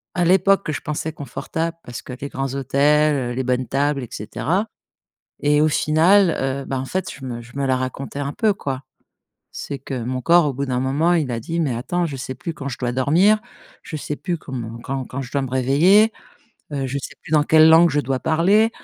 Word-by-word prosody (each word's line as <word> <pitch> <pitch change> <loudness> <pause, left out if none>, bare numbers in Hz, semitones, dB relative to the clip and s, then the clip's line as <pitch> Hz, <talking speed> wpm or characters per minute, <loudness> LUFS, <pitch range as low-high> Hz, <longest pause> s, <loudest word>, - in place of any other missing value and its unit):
à 175 -1 +2
l'époque, 190 0 +3
je - - -3
pensais 150 +1 -3
confortable. 160 +4 -4
Parce 120 -1 -7
que - - -8
les 140 - -5
grands 135 0 -3
hôtels, 140 -2 +2
les 130 - -1
bonnes 125 0 -1
tables 140 0 0
et - - -7
cetera 175 - -2 0.7
et 150 +1 +3
au 155 - +4
final, 165 +5 +4
heu, 135 +1 -2
bah, 135 - -2
en 130 - -3
fait, 185 +3 -3
je 135 - -11
me 120 -2 -5
je 120 +3 -15
me 140 -1 0
la 130 -1 +2
racontais 130 +2 -5
un 140 0 -3
peu, 220 -3 +2
quoi. 135 -6 -4 0.7
C'est 140 - -6
que 130 -2 -5
mon 130 +1 -3
corps, 170 -2 +5
au 140 - -1
bout 140 +2 -2
d'un 125 -1 -1
moment, 145 +7 +1
il 155 -6 0
a 115 - -2
dit: 165 +8 -3
«Mais 135 -7 0
attends, 175 +9 -1
je 145 -4 -5
sais 130 0 -5
plus 165 +6 -6
quand 140 -2 -6
je 130 - -6
dois 120 -1 -2
dormir, 165 - +4 0.4
je 155 - -6
sais 150 0 -4
plus 175 0 -3
comment 120 -6 -6
quand 135 -1 -3
quand 140 - -5
je 125 - -9
dois 140 - 0
me 130 - -4
réveiller, 160 - +4 0.6
heu, 135 -2 -2
je 140 +2 -3
sais - - -8
plus - - -10
dans 150 - +5
quelle 155 +1 +6
langue 165 +1 +7
je 145 +1 +1
dois 135 -2 -2
parler» 200 +8 +3
140 Hz, 225 wpm, -21 LUFS, 130-165 Hz, 0.7 s, langue